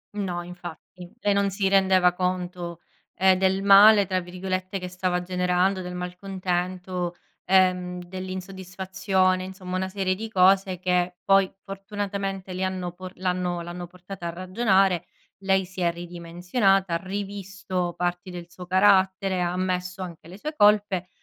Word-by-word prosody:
No 180 -4 -3
infatti. 180 +1 -10
E 205 -3 +2
non 200 0 +2
si 195 0 0
rendeva 190 -2 +4
conto, 180 -2 -3 0.4
ehm, 190 0 +4
del 190 +1 +1
"male" 200 +1 +8
tra 185 0 0
virgolette 185 +2 -4
che 180 - -5
stava 180 0 -1
generando, 180 +1 +1
del 180 0 -6
malcontento, 180 -1 -3 0.3
ehm, 180 -1 +2
dell’insoddisfazione, 185 +1 -2
insomma 185 -1 -6
una 190 0 -1
serie 190 -1 -1
di 220 +3 -6
cose 190 -1 +3
che 180 0 +1
poi 195 -1 +4
fortunatamente 195 -1 -4
le 185 +1 -3
hanno 185 -2 -3
po 185 +1 -8
l’hanno 180 -1 -1
l’hanno 175 +1 -7
portata 180 0 -8
a - - -2
ragionare. 185 0 +1 0.3
Lei 190 -1 +2
si 185 0 -8
è 170 -1 +3
ridimensionata, 175 +3 0
ha 170 - +2
rivisto 195 -2 -4
parti 175 +1 -2
del 175 -1 -8
suo 180 +1 -10
carattere, 190 0 +3
ha 175 0 0
ammesso 180 0 -2
anche 170 -3 -8
le 185 - -10
sue 305 +7 -5
colpe, 205 - +3
185 Hz, 145 wpm, -25 LUFS, 180-195 Hz, 0.4 s, male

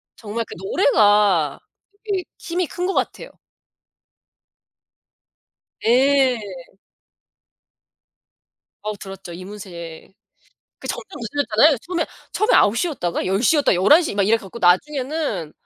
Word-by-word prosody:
정말 225 +1 -5
그 - - -10
노래가 200 - +3 0.4
되게 395 -4 -2 0.2
힘이 350 +1 -2
큰 360 +1 -3
것 390 - -1
같아요. - - -3 2.5
예. 260 +1 +4 2.5
어우 210 -1 -4
들었죠. 195 -3 -9
이문세. 185 -3 -10 0.7
그 - - -10
점점 - - -5
늦어졌잖아요. 275 +2 +2
처음에 350 -2 -1 0.3
처음에 425 +3 +2
9 210 +3 +4
시였다가 245 - -2
10 195 +4 0
시였다가 290 - +3
11 295 - +5
시 300 - -3
막 200 - +2
이래 225 +1 +4
갖고 220 +2 -10
나중에는 255 - 0
225 Hz, 220 characters per minute, -21 LUFS, 190-290 Hz, 2.5 s, 11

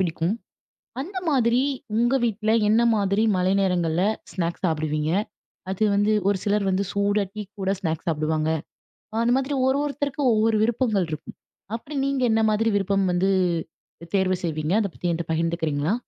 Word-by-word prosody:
பிடிக்கும். 170 +1 0 0.7
அந்த 370 +7 -5
மாதிரி 245 -4 +3 0.4
உங்க 240 +3 +2
வீட்ல 220 -1 0 0.2
என்ன 220 +2 +4 0.2
மாதிரி 200 +1 +1
மழை 185 +1 +2
நேரங்கள்ல 175 -3 +1 0.3
ஸ்நாக்ஸ் 170 +1 -3
சாப்பிடுவீங்க? 155 -1 -1 0.6
அது 195 - -4
வந்து, 205 +2 +2 0.2
ஒரு 200 -1 +2
சிலர் 205 -1 +1
வந்து 190 +1 +1
சூடா 200 0 +1
டீ 215 - -4 0.2
கூட 190 0 0
ஸ்நாக்ஸ் 165 -4 -3
சாப்பிடுவாங்க. 155 0 0 0.7
அ - - -2
அந்த 235 +1 +2
மாதிரி 270 +2 -1
ஒரு 265 +2 +2
ஒருத்தருக்கும் 285 -2 -1
ஒவ்வொரு 220 +1 +2
விருப்பங்கள் 220 -4 +1
இருக்கும். 155 0 -7 0.4
அப்படி 285 +6 -10
நீங்க 275 -1 0
என்ன 220 0 +3
மாதிரி 220 +2 +1
விருப்பம் 195 0 +1
வந்து, 185 +2 +2 0.7
அ - - -13
தேர்வு 185 -1 +1
செய்வீங்க? 155 +1 -1
அத 205 - 0
பத்தி 175 - -2
என்ட்ட 165 0 -3
பகிர்ந்துக்கிறீங்களா? 160 +1 0
195 Hz, 155 wpm, -24 LUFS, 170-225 Hz, 0.7 s, என்ன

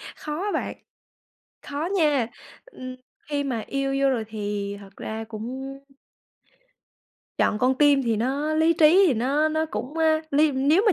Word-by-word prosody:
khó 305 +4 -5
á 415 - -1
bạn, - - -2 0.9
khó 295 +4 -4
nha, 295 -8 +3 0.4
ừm, 255 - -9 0.3
khi 290 -1 0
mà 255 -5 -2
yêu 275 0 -1
vô 275 - +4
rồi 245 -4 0
thì 205 -2 -4
thật 195 -1 -14
ra 220 +1 -5
cũng 260 +5 -6 1.6
Chọn 210 - +2
con 255 +3 +3
tim 290 -2 +5
thì 230 -3 0
nó 275 +7 -1
lý 320 +1 +4
trí 330 +4 +6
thì 295 - +3
nó 275 +7 +1
nó 315 +1 0
cũng, 300 -1 -5
a, 315 -1 +3
ly 295 +1 +3
nếu 285 +8 +3
mà 420 - +6
275 Hz, 165 wpm, -25 LUFS, 240-310 Hz, 1.6 s, trí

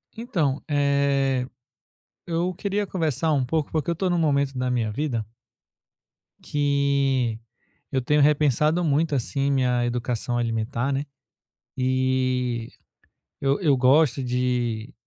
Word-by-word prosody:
Então, 175 - -1
eh, 140 -3 +1 0.8
eu 175 +2 -1
queria 200 +3 -2
conversar 160 -4 0
um 140 -3 +2
pouco, 155 +3 -1
porque 155 0 -1
eu - - -1
tô 185 +3 -1
num 175 - +1
momento 140 -4 +1
da 125 0 -1
minha 120 -3 0
vida 115 -1 -2 1.2
que 140 -5 +1 0.5
eu 130 - 0
tenho 150 +4 +2
repensado 150 +3 +3
muito, 155 0 +1
assim, 140 +2 -1
minha 125 -3 +1
educação 120 0 -2
alimentar, 115 +2 -1
né, 140 +2 -2 0.7
e 130 -2 0 0.7
eu 140 +1 +1
eu 150 -6 +4
gosto 135 +2 +3
de 125 -2 -1
135 Hz, 120 wpm, -24 LUFS, 125-150 Hz, 1.2 s, eu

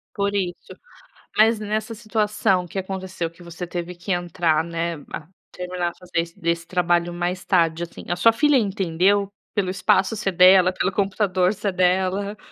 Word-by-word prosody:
Por 200 0 -1
isso, 180 -3 -3 0.6
mas 220 +1 +5
nessa 215 +1 -3
situação 210 -4 0
que 195 - -4
aconteceu 190 -2 -4
que 170 +2 -17
você 170 +1 -7
teve 175 0 -5
que 175 +3 -6
entrar, 175 -3 +1
né, 170 0 -3 0.2
a 150 - -6 0.2
terminar 180 -1 -3
a - - -14
fazer 180 -2 -4
esse 170 0 -10
desse 170 0 -1
trabalho 175 -1 +1
mais 175 +2 -3
tarde, 170 -3 +2
assim, 170 - -9
a 175 - +1
sua 230 +6 +5
filha 295 +3 +4
entendeu? 195 -2 +1 0.3
Pelo 200 -3 0
espaço 190 +3 +2
ser 200 -2 -1
dela, 185 +1 +7
pelo 185 +1 0
computador 190 -1 +1
ser 200 -1 -3
dela? 185 +3 +1
185 Hz, 170 wpm, -23 LUFS, 175-200 Hz, 0.6 s, dela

